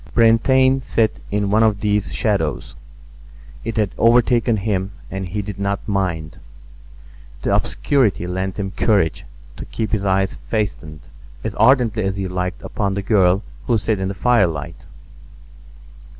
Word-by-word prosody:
Brantain 130 +3 +4
sat 110 -3 0
in 100 -1 -1
one 110 +2 +4
of 105 -2 +2
these 105 -1 0
shadows; 95 - -1 0.9
it 115 -1 -4
had 105 -3 +1
overtaken 120 0 +3
him 95 -1 -2 0.2
and 95 -2 -4
he 105 +3 -3
did 100 -1 -7
not 100 0 -2
mind. 85 -6 -2 1.0
The - - +1
obscurity 120 -11 +1
lent 95 +2 -3
him 95 -1 -3
courage 95 -6 +1 0.3
to - - -7
keep 110 -2 -4
his 105 -3 0
eyes 95 -1 +1
fastened 75 - -4 0.4
as - - -3
ardently 115 -2 +3
as 95 -1 -2
he 95 -1 -2
liked 90 +2 -4
upon 100 -2 -2
the 100 - -3
girl 95 -2 +3 0.2
who 120 - +3
sat 105 0 -1
in 95 - -1
the 100 - -4
firelight. 90 - 0
100 Hz, 145 wpm, -20 LUFS, 95-110 Hz, 1.0 s, Brantain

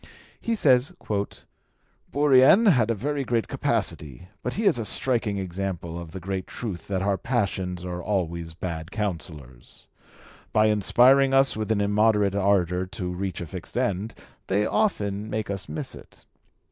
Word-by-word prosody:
He 230 - -1
says, 135 - +3 1.2
"Bourrienne... 145 - +5
had 120 -7 +2
a 115 - +1
very 140 +6 -2
great 115 -4 -1
capacity, 75 +4 -2
but 125 - -3
he 220 - -2
is 190 - +3
a - - -1
striking 115 -3 +2
example 90 -2 -4
of 85 -2 -10
the 95 - -7
great 95 +1 -4
truth 105 -8 -6
that 95 -2 -1
our 100 -2 0
passions 95 -7 -2
are 90 -1 -4
always 85 -4 -3
bad 85 -2 -5
counsellors. 80 - -6 0.7
By 110 0 +4
inspiring 130 +6 +4
us 135 0 +4
with 110 0 -3
an 105 -2 +2
immoderate 105 -1 +2
ardour 95 -2 +1
to 90 -2 -5
reach 95 0 -4
a - - -4
fixed 75 - -8
end, 100 +3 -1 0.3
they 100 +2 +1
often 105 - -1
make 110 -2 -3
us 100 -4 -5
miss 75 - -5
it. - - -15
100 Hz, 155 wpm, -25 LUFS, 90-120 Hz, 1.2 s, Bourrienne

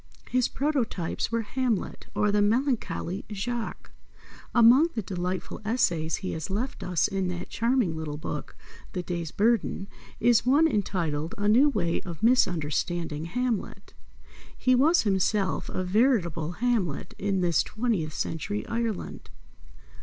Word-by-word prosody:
His 255 -1 +3
prototypes 260 - -1
were 230 0 0
Hamlet 240 -1 -2
or 210 -1 +2
the 205 0 +3
Melancholy 215 -5 0
Jacques. 230 +3 -4 0.6
Among 240 +7 +6
the 220 - -2
delightful 180 0 -4
essays 170 -9 +1
he - - -2
has 160 +2 -4
left 225 +7 -3
us 180 -3 +1
in 190 -1 -1
that 180 0 -5
charming 230 -7 +1
little 155 -2 -4
book, 155 - -6 0.4
The 180 - -3
Day's 170 -2 -3
Burden, 215 0 +1 0.3
is 240 -2 +4
one 285 +6 +5
entitled 170 - -1
"A 205 0 0
new 250 +8 +6
way 175 -10 0
of 170 -1 -8
misunderstanding 170 - +1
Hamlet." 235 +5 -3 0.6
He 255 - +3
was 305 +7 +4
himself 195 -4 +1
a 185 - -2
veritable 180 - +1
Hamlet 200 - -1
in 195 -1 0
this 170 -2 +3
twentieth 215 -10 -2
century 205 +8 -3
Ireland. 230 -3 -3
205 Hz, 130 wpm, -27 LUFS, 175-240 Hz, 0.6 s, Among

